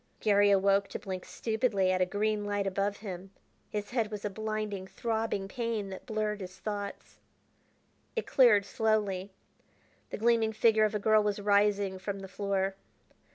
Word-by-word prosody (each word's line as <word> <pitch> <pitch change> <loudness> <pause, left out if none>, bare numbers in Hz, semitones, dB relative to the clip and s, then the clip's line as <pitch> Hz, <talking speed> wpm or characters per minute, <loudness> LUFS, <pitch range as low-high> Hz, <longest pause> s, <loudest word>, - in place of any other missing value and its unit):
Garry 205 -1 +4
awoke 195 0 +3
to - - -5
blink 185 -2 -6
stupidly 220 -4 0
at 185 0 +1
a 180 - +3
green 210 +2 0
light 205 -1 -1
above 195 +1 -1
him. 185 -1 -6 0.4
His 210 +1 -4
head 230 -4 0
was 210 -1 -6
a 205 - -2
blinding, 215 -2 -3
throbbing 220 -1 -2
pain 225 -2 -3
that 190 - -9
blurred 215 -2 -2
his 185 0 -8
thoughts. 205 -1 -6 1.0
It 455 - -1
cleared 225 -6 +5
slowly. 205 -3 0 0.8
The - - -5
gleaming 225 0 +2
figure 220 0 +4
of 215 0 -1
a - - 0
girl 215 +1 +4
was 210 -1 -1
rising 200 -1 +2
from 200 0 -4
the 195 - -7
floor. 195 0 -1
205 Hz, 160 wpm, -30 LUFS, 195-215 Hz, 1.0 s, cleared